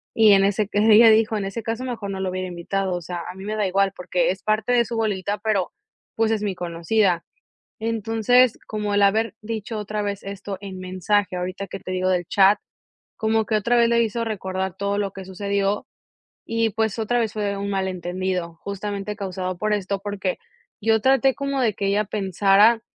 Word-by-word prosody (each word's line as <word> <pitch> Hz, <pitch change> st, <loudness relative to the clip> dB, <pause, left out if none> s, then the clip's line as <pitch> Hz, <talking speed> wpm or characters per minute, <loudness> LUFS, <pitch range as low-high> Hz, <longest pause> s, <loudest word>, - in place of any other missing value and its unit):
Y 220 Hz, -2 st, +6 dB
en 195 Hz, 0 st, +5 dB
ese 200 Hz, +1 st, +1 dB
ca 205 Hz, -, -1 dB
ella 220 Hz, +1 st, +7 dB
dijo: 220 Hz, 0 st, +3 dB
"En 200 Hz, -, -2 dB
ese 195 Hz, +4 st, -4 dB
caso, 230 Hz, +2 st, -3 dB
mejor 230 Hz, -5 st, -4 dB
no 195 Hz, -1 st, -4 dB
lo 190 Hz, -1 st, -2 dB
hubiera 185 Hz, 0 st, -3 dB
invitado". 185 Hz, +2 st, -2 dB
O 175 Hz, -, -4 dB
sea, 175 Hz, +1 st, -5 dB
a 180 Hz, -, -7 dB
mí 190 Hz, -, -9 dB
me 215 Hz, +1 st, -2 dB
da 210 Hz, -2 st, +1 dB
igual 195 Hz, +1 st, +2 dB
porque 180 Hz, -1 st, 0 dB
es 190 Hz, -, -6 dB
parte 215 Hz, +2 st, 0 dB
de 235 Hz, -1 st, +4 dB
su 235 Hz, -, -5 dB
bolita, 205 Hz, -2 st, -1 dB
pero 205 Hz, -4 st, 0 dB, 0.4 s
pues 225 Hz, 0 st, +2 dB
es 220 Hz, -, 0 dB
mi 200 Hz, -3 st, -2 dB
conocida. 175 Hz, +2 st, 0 dB, 0.5 s
Entonces, 225 Hz, +2 st, +2 dB
como 210 Hz, -1 st, -2 dB
el 205 Hz, -, +3 dB
haber 210 Hz, +2 st, +2 dB
dicho 220 Hz, 0 st, -4 dB
otra 210 Hz, 0 st, -3 dB
vez 200 Hz, -1 st, -3 dB
esto 200 Hz, 0 st, -6 dB
en 195 Hz, -2 st, -7 dB
mensaje 185 Hz, +1 st, 0 dB
ahorita 185 Hz, +2 st, -4 dB
que 195 Hz, -1 st, -7 dB
te 185 Hz, -, -8 dB
digo 185 Hz, 0 st, 0 dB
del 175 Hz, -2 st, 0 dB
chat, 195 Hz, +2 st, +5 dB, 0.6 s
como 220 Hz, 0 st, +1 dB
que 220 Hz, -, -1 dB
otra 235 Hz, +3 st, +2 dB
vez 235 Hz, -1 st, +5 dB
le 235 Hz, 0 st, +3 dB
hizo 230 Hz, +1 st, -1 dB
recordar 190 Hz, -3 st, -3 dB
todo 200 Hz, +1 st, -1 dB
lo 200 Hz, -2 st, -1 dB
que 190 Hz, -1 st, -8 dB
sucedió, 200 Hz, +2 st, -1 dB, 0.6 s
y 230 Hz, -1 st, 0 dB
pues 220 Hz, 0 st, -1 dB
otra 240 Hz, +2 st, +1 dB
vez 225 Hz, -3 st, -1 dB
fue 210 Hz, -1 st, -3 dB
de 200 Hz, 0 st, -1 dB
un 200 Hz, 0 st, -3 dB
malentendido, 185 Hz, -2 st, -2 dB
justamente 200 Hz, +1 st, -4 dB
causado 185 Hz, -2 st, -4 dB
por 215 Hz, +1 st, 0 dB
esto, 200 Hz, -1 st, -1 dB
porque 200 Hz, -2 st, -3 dB, 0.4 s
yo 220 Hz, +1 st, +3 dB
traté 265 Hz, +1 st, +4 dB
como 275 Hz, -1 st, -2 dB
de 220 Hz, -4 st, +2 dB
que 200 Hz, -, -3 dB
ella 205 Hz, +2 st, +2 dB
pensara 200 Hz, +3 st, +3 dB
200 Hz, 205 wpm, -23 LUFS, 190-220 Hz, 0.6 s, ella